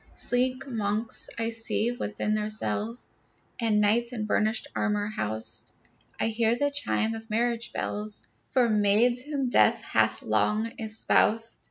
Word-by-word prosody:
Sleek 255 +1 -1
monks 220 -2 -2
I 230 0 0
see 225 0 0
within 215 -3 -2
their 215 0 -1
cells, 215 - -2 0.5
And 220 -3 +2
knights 235 +4 +2
in 215 -3 -3
burnished 215 +2 0
armor 210 -1 0
housed. 110 - -3 0.4
I - - +1
hear 225 +1 +1
the 285 +3 0
chime 255 -6 0
of 225 0 -8
marriage 235 +1 0
bells 210 0 -4 0.3
For 255 -3 +3
maids 215 +3 +3
whom 280 -2 -2
death - - +4
hath - - +1
long 220 +2 +1
espoused. 225 0 +2
225 Hz, 140 wpm, -27 LUFS, 210-240 Hz, 0.5 s, death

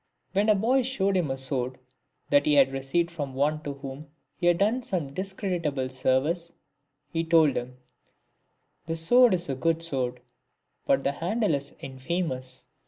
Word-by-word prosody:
When 205 +2 +2
a 215 - +6
boy 240 +7 +2
showed 205 -7 0
him 175 -6 +1
a 135 - -2
sword 130 -1 -2 0.5
that 285 +2 +4
he 300 - +4
had 275 -2 +5
received 150 +6 0
from 145 -5 -5
one 150 +3 +1
to 145 -2 -5
whom 140 +2 -8 0.3
he 175 - -1
had 175 -1 +4
done 215 +7 +2
some 170 - -3
discreditable 175 -8 -2
service, 135 +7 0 0.6
he 165 0 0
told 160 -4 +4
him, 125 +1 -4 0.6
" - - -47
The 165 - -1
sword 220 +7 +5
is 175 0 -5
a 135 - -1
good 165 +5 0
sword, 130 -6 -2 0.7
but 135 0 +3
the 140 - +1
handle 190 +6 0
is 140 0 -3
infamous." 130 -2 -4
165 Hz, 170 wpm, -27 LUFS, 135-190 Hz, 0.7 s, a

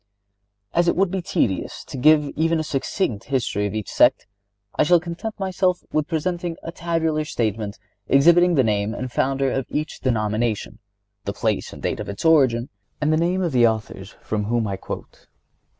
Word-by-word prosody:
As 175 0 +2
it - - +3
would 190 0 +2
be 190 -1 -1
tedious 160 - -1
to - - -9
give 150 +3 +5
even 165 +1 +1
a - - -1
succinct 135 - -2
history 115 -6 -1
of 100 - -6
each 110 -3 -3
sect, - - +4 0.5
I - - +2
shall 175 +3 +5
content 175 +6 -6
myself 185 -1 0
with 155 -1 0
presenting 170 +1 -2
a 165 - -5
tabular 165 -3 -1
statement 110 -6 -2 0.3
exhibiting 170 +5 +5
the 135 - +4
name 105 0 0
and 130 0 -5
founder 135 +1 +1
of 135 -2 -2
each 155 +2 -3
denomination, 110 -2 -1 0.5
the 100 - -2
place 110 -1 -1
and - - -11
date - - -1
of - - -5
its 100 +10 -6
origin, 130 -7 +4 0.3
and 150 +1 +2
the - - +3
names 180 +3 +1
of 170 - -1
the 120 -3 +5
authors 105 -3 -4
from 105 -1 -2
whom 115 +1 0
I 100 -2 -2
quote. 95 - -9
140 Hz, 180 wpm, -22 LUFS, 110-170 Hz, 0.5 s, give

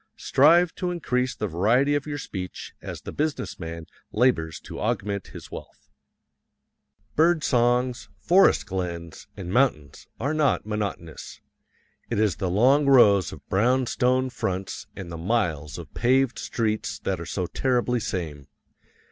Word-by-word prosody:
Strive 165 +6 +4
to 180 -1 -3
increase 130 -8 -1
the 105 - -3
variety 110 - +2
of 145 0 -1
your 145 -1 -3
speech 95 -9 -7
as - - -7
the - - -7
business 145 -11 -3
man 85 -1 -6 0.3
labors 105 -10 +1
to - - -8
augment 100 -1 -2
his - - -11
wealth. - - -11 1.3
Bird 165 0 +3
songs, 120 -2 +1
forest 180 - +4
glens, 85 -4 -5
and 90 -1 -5
mountains 110 - 0
are 140 +3 -1
not 150 -8 +1
monotonous 100 -7 -5 0.7
it 115 - -1
is 110 -3 +2
the 95 -3 -2
long 130 +10 +4
rows 105 -9 +6
of - - -12
brown 125 +6 +2
stone 130 +2 +1
fronts 95 -5 -4
and 90 -3 -7
the 85 - -5
miles 80 -7 -1
of - - -10
paved 130 +1 +2
streets 110 -2 -2
that 95 -3 -3
are 85 - -6
so 90 - -2
terribly 125 +3 0
same. 80 -10 -4
110 Hz, 145 wpm, -25 LUFS, 90-130 Hz, 1.3 s, rows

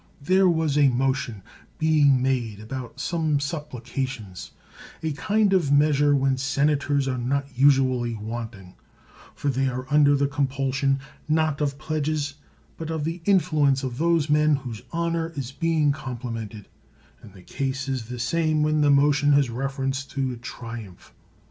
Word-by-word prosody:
There 185 +5 +3
was 160 -3 +1
a 140 -2 +6
motion 130 -4 -1 0.3
being 145 -5 +3
made 120 -6 -1
about 130 +5 -7
some 155 -2 0
supplications 135 - -5 0.3
— - - -17
a 160 - 0
kind 205 +6 +1
of 170 -7 +2
measure 145 0 +4
when 135 -1 +1
senators 140 +1 +1
are 130 -1 -1
not 140 +3 -1
usually 130 -3 +3
wanting; 110 -3 -7 0.6
for 145 - -2
they 135 0 +1
are 130 0 -4
under 145 -1 +5
the 140 0 +2
compulsion, 135 -1 0 0.3
not 155 -2 +1
of 140 -2 -1
pledges, 155 -1 -2 0.4
but 160 -1 -6
of 160 -2 -2
the 165 +3 -3
influence 150 -8 +3
of 130 -1 -4
those 165 -2 +2
men 150 0 +3
whose 125 -6 -6
honor 170 -1 -1
is 135 -3 -4
being 155 +1 +1
complimented; 115 -6 -6 0.5
and 105 - -14
the 90 - -14
case 135 +2 -3
is 130 -4 -2
the 125 +2 -7
same 155 +5 +1
when 155 0 +2
the 145 - +4
motion 145 +1 +4
has 140 -4 +3
reference 135 +2 -2
to 135 -2 -2
a - - -8
triumph. 115 -5 -9
140 Hz, 155 wpm, -24 LUFS, 130-150 Hz, 0.6 s, a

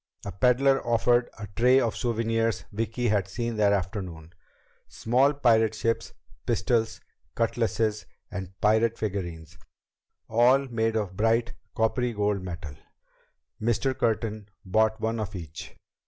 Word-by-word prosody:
A 100 - -4
peddler 130 +7 +3
offered 120 +1 +2
a 110 - -6
tray 125 +3 +5
of 115 -4 +1
the - - -9
souvenirs 115 -2 0
Vicki 115 +3 -1
had 100 -2 +1
seen 115 +3 -3
that 105 -1 +4
afternoon 90 -4 -3 0.5
small 130 +5 +2
pirate 115 -6 +3
ships, 115 +1 -1 0.4
pistols, 115 -2 0 0.3
cutlasses, 115 -2 0 0.2
and 95 -1 -7
pirate 110 +2 +3
figurines, 85 -6 -5 0.7
all 125 +4 +4
made 115 -2 0
of 100 -4 -2
bright 115 +3 +1 0.2
coppery 120 +2 +1
gold 105 -2 0
metal. 85 -5 -7 0.9
Mr. 120 +4 +1
Curtin 110 -3 -1 0.2
bought 110 +3 +2
one 115 +1 -1
of 105 -2 -4
each. 80 -3 -8
110 Hz, 125 wpm, -27 LUFS, 100-120 Hz, 0.9 s, tray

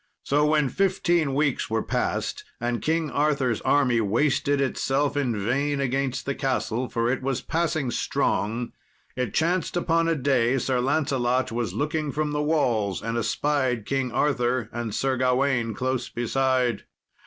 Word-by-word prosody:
So 150 +2 +2
when 150 -2 +3
fifteen 175 -6 +1
weeks 145 -2 0
were 110 0 0
passed, - - -2 0.2
and 120 0 -2
King 160 -1 0
Arthur's 140 -6 +1
army 125 -5 +3
wasted 140 +6 +1
itself 140 +1 0
in 130 -6 0
vain 140 +7 0
against 135 -1 -1
the 140 - -1
castle, 130 -3 -1
for 115 +1 0
it 130 - -2
was 135 -1 -1
passing 160 -5 -1
strong, 115 +2 -1 0.4
it 125 -4 -3
chanced 170 +1 +1
upon 165 -1 +1
a 165 - +2
day 130 -3 +2
Sir 130 0 0
Lancelot 130 -2 +1
was 115 -5 -2
looking 150 +3 -1
from 150 +1 -1
the 150 0 -1
walls 120 - 0
and 115 +1 -2
espied 125 -1 0
King 135 -2 -1
Arthur 125 -4 0
and 120 -2 -3
Sir 135 -1 0
Gawain 125 -2 +1
close 130 -1 -2
beside. 125 -1 0
135 Hz, 150 wpm, -25 LUFS, 120-145 Hz, 0.4 s, when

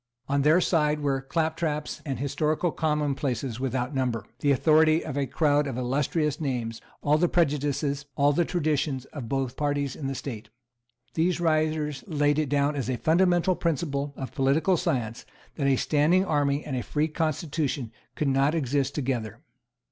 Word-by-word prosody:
On 140 +1 +1
their 155 +5 +5
side 150 -4 +1
were 135 -2 0
claptraps 160 +1 -2
and 135 -3 -2
historical 150 +5 0
commonplaces 140 -6 -1
without 130 +1 -2
number, 125 -6 -1
the 145 - +1
authority 155 +3 +4
of - - -5
a 140 -1 0
crowd 145 -1 +2
of 130 -3 -4
illustrious 145 +4 0
names, 120 -6 -3 0.2
all 150 +1 +3
the 175 +1 +3
prejudices, 145 -2 0
all 145 +1 +3
the 175 - +2
traditions, 150 -6 -1
of 130 -7 -6
both 135 -2 0
the 125 - -18
parties 145 -2 -1
in 140 - -5
the 135 - -3
state. 115 -5 -6 0.6
These 175 +2 +1
writers 155 -3 0
laid 145 -3 +2
it 150 -3 0
down 145 +1 +1
as 130 -3 -2
a 125 - 0
fundamental 175 +4 +3
principle 145 -4 -1
of 130 - -6
political 140 +8 +2
science 115 -7 -2 0.3
that 140 -3 -1
a 135 - +4
standing 155 +8 +2
army 145 -3 +1
and 140 - -3
a 125 - -1
free 150 +5 0
constitution 155 -5 -2 0.2
could 150 - -1
not 135 +3 +2
exist 140 -2 0
together. 120 -5 -3
145 Hz, 165 wpm, -26 LUFS, 135-155 Hz, 0.6 s, their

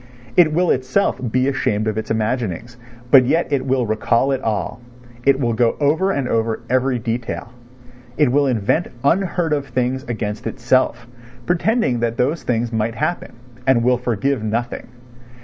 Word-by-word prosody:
It 170 -3 +5
will 175 +3 +2
itself 130 +9 0
be 130 +2 +2
ashamed 110 -6 0
of 110 - -1
its 110 - -4
imaginings, 115 0 -2 0.4
but 135 -2 +8
yet 160 +3 +1
it 135 -1 0
will 130 -2 +1
recall 115 +4 +1
it 135 - -1
all, 110 +2 -2 0.5
it 140 -1 +5
will 120 -4 0
go 115 +1 +2
over 155 +7 +2
and 140 -9 -1
over 115 -1 -1
every 130 0 +2
detail, 115 +1 -4 0.6
it 145 -5 +3
will 140 +1 +3
invent 125 - +1 0.2
unheard 175 0 +1
of 140 -1 -2
things 130 +1 -1
against 110 -3 -4
itself, 120 -1 0 0.4
pretending 175 - +1
that 115 0 -1
those 145 +7 0
things 120 -1 -1
might 110 +1 -1
happen, 175 +9 -2 0.3
and 125 -3 +4
will 125 0 +3
forgive 125 +2 -1
nothing. 115 +3 -3
125 Hz, 160 wpm, -20 LUFS, 115-140 Hz, 0.6 s, but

